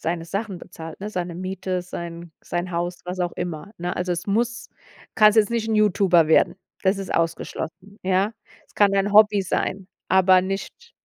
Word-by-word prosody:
seine 165 0 -2
Sachen 200 +1 -4
bezahlt, 160 0 -10
ne? 210 +2 -5
Seine 175 -3 -3
Miete, 185 0 -3
sein 170 -1 -7
sein 175 +1 -3
Haus, 175 +1 -3
was 180 +1 -5
auch 175 -1 -1
immer, 175 +3 -5
ne? 175 +1 -3
Also, 180 0 -1
es 175 +3 -4
muss 235 +3 -1 0.5
kannst 215 0 +6
jetzt 215 -1 +4
nicht 230 -1 -1
'n 220 - +1
Youtuber 190 -6 +4
werden. 160 - +4 0.3
Das 195 +1 +3
ist 195 - -5
ausgeschlossen, 170 +4 -3
ja. 190 +3 +2 0.3
Es - - -28
kann 200 -1 +4
dein 200 +1 +1
Hobby 210 -1 +6
sein, 190 +1 -2 0.2
aber 185 0 +5
nicht 195 - -6
185 Hz, 180 wpm, -23 LUFS, 175-205 Hz, 0.5 s, kannst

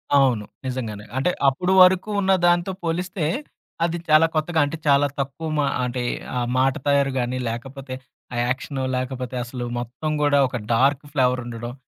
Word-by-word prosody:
అవును. 125 -7 +3 0.2
నిజంగానే. 115 -5 -4
అంటే 140 +7 +2 0.2
అప్పుడు 180 +8 +1
వరకు 185 +3 +5
ఉన్న 190 0 +2 0.2
దాంతో 175 +2 +2
పోలిస్తే, 170 0 -2 0.6
అది 170 0 -1
చాలా 155 +1 +6
కొత్తగా 160 +1 +1
అంటే, 145 +3 -4
చాలా 140 0 +5
తక్కువ 140 +4 -3
మా 145 - +3 0.2
అంటే 125 0 -3 0.3
ఆ - - +1 0.2
మాట 135 0 +3
తయారు 140 -1 +3
గాని, 125 +1 -1
లేకపోతే 130 +3 -6 0.4
ఆ - - -3
యాక్షను, 130 +1 -2
లేకపోతే 125 -1 -4
అసలు 120 0 -5
మొత్తం 125 +6 -4
గూడా 145 -1 +4
ఒక 125 - -4 0.2
డార్క్ 135 +4 +3
ఫ్లేవర్ 125 -3 +2
ఉండడం. 120 0 -6
135 Hz, 155 wpm, -23 LUFS, 125-155 Hz, 0.6 s, చాలా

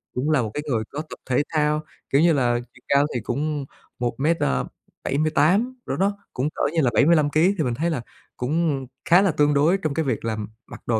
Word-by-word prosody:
Cũng 135 +5 -1
là 150 -4 +3
một 110 -3 -3
cái 150 - -3
người 115 -4 0
có 145 - -4
tập 160 - -10
thể 130 +3 +2
thao, 150 0 +1 0.3
kiểu 140 +3 +3
như 170 -1 +5
là, 120 -3 +2
chiều 125 - -20
cao 140 +1 +4
thì 125 - -1
cũng 145 +3 -2 0.3
1 120 +1 -2
mét, 165 +4 +2
ờ, 65 -1 0 0.4
78 160 - +1
cỡ - - -2
đó, 200 +2 0 0.2
cũng 135 +4 -1
cỡ - - -4
như 165 - +2
là 125 - +2
75 150 +3 +4
ký, 175 +7 +3
thì 160 - +1
mình 125 -3 -1
thấy 165 +7 -1
là 145 -7 -2 0.4
cũng 145 +1 0 0.2
khá 175 +3 +7
là 195 -4 +3
tương 150 -1 +2
đối 155 +7 +3
trong 155 -6 -2
cái 160 -1 -1
việc 115 -4 -2
là, 115 - 0
ừm, 105 -1 -4 0.2
mặc - - -11
đồ 115 -2 +1
150 Hz, 240 wpm, -23 LUFS, 125-160 Hz, 0.4 s, khá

